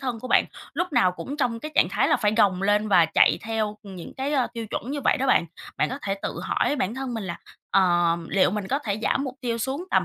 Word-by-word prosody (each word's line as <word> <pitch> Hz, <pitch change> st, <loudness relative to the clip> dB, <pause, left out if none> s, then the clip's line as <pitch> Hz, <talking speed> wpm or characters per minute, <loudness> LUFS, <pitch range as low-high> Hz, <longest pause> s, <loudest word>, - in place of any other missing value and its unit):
thân 250 Hz, -4 st, -3 dB
của 255 Hz, -, -7 dB
bạn -, -, +4 dB, 0.3 s
lúc 350 Hz, -1 st, -2 dB
nào 185 Hz, -9 st, +3 dB
cũng 280 Hz, +10 st, -6 dB
trong 240 Hz, -5 st, -1 dB
cái 305 Hz, -, -6 dB
trạng -, -, +4 dB
thái -, -, +1 dB
là -, -, +4 dB
phải 210 Hz, -1 st, +1 dB
gồng 195 Hz, -4 st, +3 dB
lên 210 Hz, +1 st, +2 dB
và 180 Hz, -4 st, +6 dB
chạy 160 Hz, -, +4 dB
theo 220 Hz, -1 st, -2 dB
những 190 Hz, -5 st, -9 dB
cái, 270 Hz, +2 st, -2 dB
ờ, 265 Hz, -4 st, +2 dB
tiêu 230 Hz, -2 st, -5 dB
chuẩn 230 Hz, +4 st, -5 dB
như 290 Hz, 0 st, -3 dB
vậy -, -, +2 dB
đó 265 Hz, -, -1 dB
bạn. 175 Hz, -9 st, +3 dB, 0.3 s
Bạn -, -, +1 dB
có 265 Hz, -, -5 dB
thể 195 Hz, -, -1 dB
tự -, -, -4 dB
hỏi 290 Hz, -, 0 dB
bản 215 Hz, -3 st, -1 dB
thân 260 Hz, -1 st, -4 dB
mình 220 Hz, -3 st, -4 dB
là 170 Hz, -2 st, -5 dB, 0.3 s
"Ờm, 175 Hz, -3 st, +2 dB
liệu 190 Hz, -2 st, +3 dB
mình 200 Hz, -1 st, -4 dB
có 275 Hz, -, +1 dB
thể 215 Hz, -7 st, -3 dB
giảm 275 Hz, -, +1 dB
mục 260 Hz, -1 st, -5 dB
tiêu 235 Hz, -2 st, -2 dB
xuống 270 Hz, +9 st, -3 dB
tầm -, -, +3 dB
225 Hz, 270 wpm, -25 LUFS, 195-265 Hz, 0.3 s, và